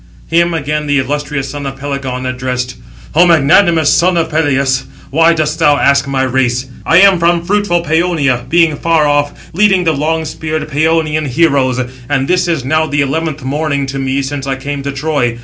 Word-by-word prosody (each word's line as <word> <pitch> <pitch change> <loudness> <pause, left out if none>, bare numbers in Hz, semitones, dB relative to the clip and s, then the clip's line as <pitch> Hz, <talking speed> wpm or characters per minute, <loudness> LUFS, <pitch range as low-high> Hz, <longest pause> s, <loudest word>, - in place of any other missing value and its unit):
Him 170 +1 +2
again 150 0 -2
the 145 0 +1
illustrious 140 0 -3
son 145 0 -5
of 135 0 -6
Pelegon 135 -2 -4
addressed: 125 0 -3 0.4
"O 175 +3 +5
magnanimous 165 0 +4
son 180 0 +2
of 165 -1 -1
Peleus, 135 -4 0 0.3
why 165 +3 +4
dost 155 -1 -2
thou 145 -1 +4
ask 140 0 +2
my 135 -1 -1
race? 130 -1 0 0.2
I 165 +3 +5
am 195 -3 +5
from 170 0 +1
fruitful 195 -3 0
Pæonia, 155 -6 0
being 165 -3 +3
far 165 -1 +1
off, 145 0 -1
leading 190 0 +3
the 165 -2 +1
long 160 +3 -1
speared 155 0 -4
Pæonian 155 0 0
heroes; 135 -3 +1 0.3
and 135 -2 0
this 180 0 +1
is 160 -7 -1
now 155 +3 +1
the 145 -1 0
eleventh 155 +1 -2
morning 140 +1 -1
to 135 0 -5
me 135 +1 -1
since 135 0 -5
I 135 - -1
came 140 +1 -5
to 140 +1 -4
Troy. 140 -4 -1
145 Hz, 185 wpm, -13 LUFS, 135-165 Hz, 0.4 s, O